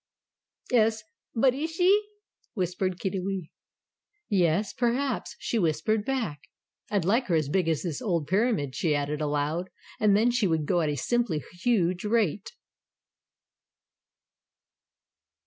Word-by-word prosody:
"'Es, 220 -2 +3 0.3
but 255 +2 +4
IS 320 +4 -4
she?" 390 +4 +4 0.5
whispered 185 -1 -1
Kiddiwee. 190 -2 -3 0.8
"Yes 185 0 +2
perhaps," 250 +1 -1
she 230 - -1
whispered 175 +5 +1
back. 225 - -2 0.5
"I'd 200 -5 0
like 230 +7 +2
her 175 - +2
as 155 -3 +1
big 175 +1 +1
as 160 -3 0
this 165 -6 -3
old 170 -7 0
Pyramid," 190 - +1
she 155 0 +1
added, 145 +1 -2
aloud. 150 +4 -1 0.3
"And 205 -2 +4
then 235 +3 +3
she 240 -4 +2
would 160 -3 0
go 175 +3 +2
at 155 - 0
a 145 - -2
simply 200 - 0 0.2
huge 185 -6 +1
rate!" 210 - 0
190 Hz, 130 wpm, -27 LUFS, 160-230 Hz, 0.8 s, but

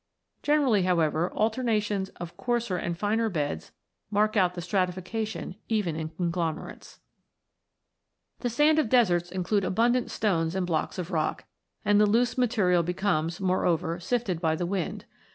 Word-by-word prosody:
Generally, 285 -9 +3
however, 170 -2 +1
alterna 225 +1 +1
tions 205 -2 -2
of 170 -1 -8
coarser 235 -5 -1
and 170 -1 -3
finer 220 +3 +1
beds 145 - -3 0.4
mark 215 +1 +2
out 180 -3 +3
the 175 - -4
stratifica 185 +4 -1
tion 210 -4 -6
even 205 -8 0
in 160 0 -4
conglomerates. 170 -1 -4 1.4
The 245 - -1
sands 295 +6 +4
of 230 - -3
deserts 180 -9 +3
include 190 +2 0
abundant 235 +6 +1
stones 165 -5 0
and 190 -1 0
blocks 165 0 -1
of 180 0 -4
rock, 155 -3 -1 0.4
and 205 0 +4
the 210 - +5
loose 235 +3 +2
material 215 -8 +2
becomes, 170 -1 -1
more 185 -1 +1
over, 170 0 0
sifted 190 -3 -1
by 160 -2 +2
the 175 - -2
wind. 185 -1 -3
185 Hz, 150 wpm, -27 LUFS, 170-220 Hz, 1.4 s, the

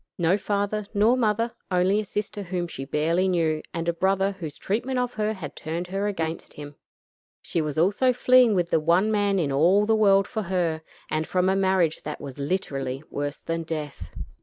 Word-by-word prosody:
No 170 +1 +3
father 205 0 -2
nor 215 +5 +4
mother; 230 -1 +1 0.2
only 185 +2 +2
a - - -1
sister 205 +1 -4
whom 180 -2 -3
she 135 -5 -7
barely 165 +6 +1
knew, 160 -4 +1
and 165 -1 -4
a 170 - +2
brother 195 +3 +1
whose 165 -7 -7
treatment 240 +6 -2
of 250 -1 -1
her 215 0 -1
had 165 -9 -8
turned 165 +3 -4
her 195 +1 -3
heart 205 +1 0
against 165 -4 -4
him. 145 0 -9 0.7
She 165 - -1
was 150 -2 -3
also 200 +10 +3
fleeing 250 -2 +5
with 175 -2 +1
the 165 - +3
one 175 +7 +2
man 205 -2 +2
in 155 -6 0
all 175 +9 +4
the 220 +1 +3
world 195 -2 +4
for 220 - -3
her, 170 -4 -1 0.3
and 155 0 -1
from 185 0 +1
a 190 - +2
marriage 190 -4 +2
that 150 - -6
was 140 -1 -8
literally 140 -4 -2
worse 145 0 -3
than 165 0 -2
death. 155 -3 -5
185 Hz, 200 wpm, -25 LUFS, 160-205 Hz, 0.7 s, fleeing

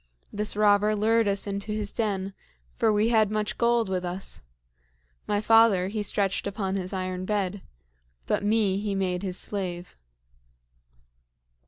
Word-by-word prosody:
This 210 0 -1
robber 210 0 +3
lured 225 +1 +2
us 200 0 0
into 200 +1 -4
his 210 -1 -2
den, 195 -3 -2 0.4
for 220 - +2
we 210 +2 +2
had 220 -3 +3
much 215 -1 -2
gold 235 -2 +2
with 185 -1 -2
us. 180 - -4 0.9
My 205 - +1
father, 215 -4 +4
he 215 +1 -3
stretched 200 -1 0
upon 195 -1 -2
his 185 -1 -3
iron 185 -1 -3
bed; 200 -1 -2 0.6
but - - 0
me, 205 -2 +2
he 205 -1 -2
made 180 -2 -1
his 185 -2 -3
slave." 180 -3 -4
205 Hz, 145 wpm, -26 LUFS, 190-215 Hz, 0.9 s, father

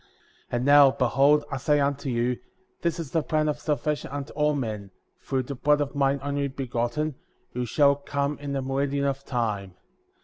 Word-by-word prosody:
62. - - -2
And 120 +1 0
now, 145 -1 +8
behold, 135 +4 +3
I 135 - -1
say 145 +2 +2
unto 140 -1 0
you: 120 0 0 0.4
This 170 -1 -1
is 160 -5 -5
the 165 - +2
plan 155 0 0
of 150 - -1
salvation 150 0 -1
unto 140 0 -6
all 150 0 +1
men, 110 -7 -4 0.3
through 130 -1 -2
the 140 - -6
blood 150 +3 +2
of 145 -2 -2
mine 140 -1 +1
Only 140 0 -1
Begotten,^ 130 +2 -2 0.4
who 125 0 -2
shall 140 +3 +4
come 140 0 -2
in 145 -1 -5
the 135 -1 -1
meridian 140 +1 0
of 140 0 -1
time. 105 -7 -2
140 Hz, 190 wpm, -26 LUFS, 125-145 Hz, 0.4 s, now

